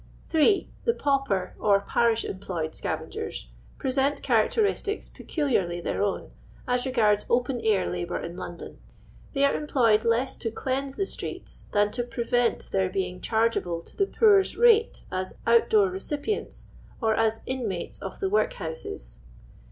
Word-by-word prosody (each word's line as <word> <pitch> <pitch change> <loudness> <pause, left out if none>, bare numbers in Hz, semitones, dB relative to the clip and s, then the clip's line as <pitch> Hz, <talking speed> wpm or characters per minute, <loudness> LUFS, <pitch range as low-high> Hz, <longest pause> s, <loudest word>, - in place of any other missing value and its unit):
3. 335 +6 +3 0.2
The 465 - +2
Pauper, 275 - 0
or 200 -2 +4
Parish 230 +2 +2
employed 175 -5 -4
Scavengers - - -4 0.3
present 270 +2 0
characteristics 415 -1 +1
peculiarly 195 - -1
their 175 - -2
own, 200 -1 -1 0.4
as 250 +1 +1
re - - -1
gards 210 -4 +3
open 245 0 +1
air 205 -4 +3
labour 175 -1 -3
in 170 +1 -6
London. 175 -1 -8 0.5
They 280 -1 +3
are 280 - +3
em 300 - -3
ployed 230 -6 +3
less 235 +3 +1
to 225 - -2
cleanse 265 +4 -2
the 390 - 0
streets, - - -6
than 205 0 +3
to 240 +3 -2
prevent 240 0 0
their 190 -1 +1
being 180 -1 -3
ch.irgeable 220 -7 0
to - - -16
the 395 - +1
poor's 405 -3 +4
rate 460 -1 +4
as 185 0 -3
out 235 0 +4
door 200 -4 +4
recipients, 290 - -3 0.3
or 225 -3 +2
as 225 0 +1
inmates 225 -9 -3
of 195 - -6
the 195 - 0
workhouses. 160 - -2
230 Hz, 150 wpm, -26 LUFS, 190-275 Hz, 0.5 s, or